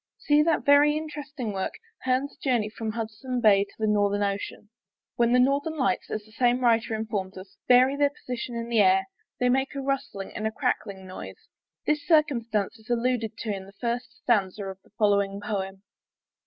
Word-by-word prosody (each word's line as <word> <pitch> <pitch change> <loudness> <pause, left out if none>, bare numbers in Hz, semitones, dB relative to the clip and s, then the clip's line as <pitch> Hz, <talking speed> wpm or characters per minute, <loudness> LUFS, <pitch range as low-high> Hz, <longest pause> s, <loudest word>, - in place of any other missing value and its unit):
See 295 0 +3
that 320 0 +1
very 290 +1 +6
interesting 290 -7 -5
work, 190 -1 -3 0.3
Hearne's 260 +2 0
Journey 240 -6 0
from 220 -1 -4
Hudson's 235 +3 -4
Bay 200 -2 +6
to - - -21
the 220 - -1
Northern 205 -1 +2
Ocean. 200 +1 -4 0.4
When 235 0 +3
the 250 - +5
Northern 280 +5 +2
Lights, 195 -10 0
as 215 -1 -4
the 215 - -19
same 245 +2 +2
writer 230 -2 +2
informs 205 -4 -3
us, 190 +1 -11
vary 255 +2 +6
their 285 0 +3
position 250 -4 -6
in 230 0 -3
the 235 -2 +2
air, 190 -1 +5 0.3
they 250 - +2
make 265 +3 +1
a - - -2
rustling 275 -7 -3
and 215 - -1
a - - -2
crackling 195 -3 -2
noise. 185 - -9 0.4
This 300 0 +1
circumstance 235 - +2
is 220 - -20
alluded 235 -2 0
to 215 -3 -3
in 190 0 -8
the 195 - -14
first 240 +3 -3
stanza 205 -4 +1
of 190 -1 -7
the - - -26
following 200 -2 +2
poem. 195 -2 -4
230 Hz, 185 wpm, -26 LUFS, 205-260 Hz, 0.4 s, very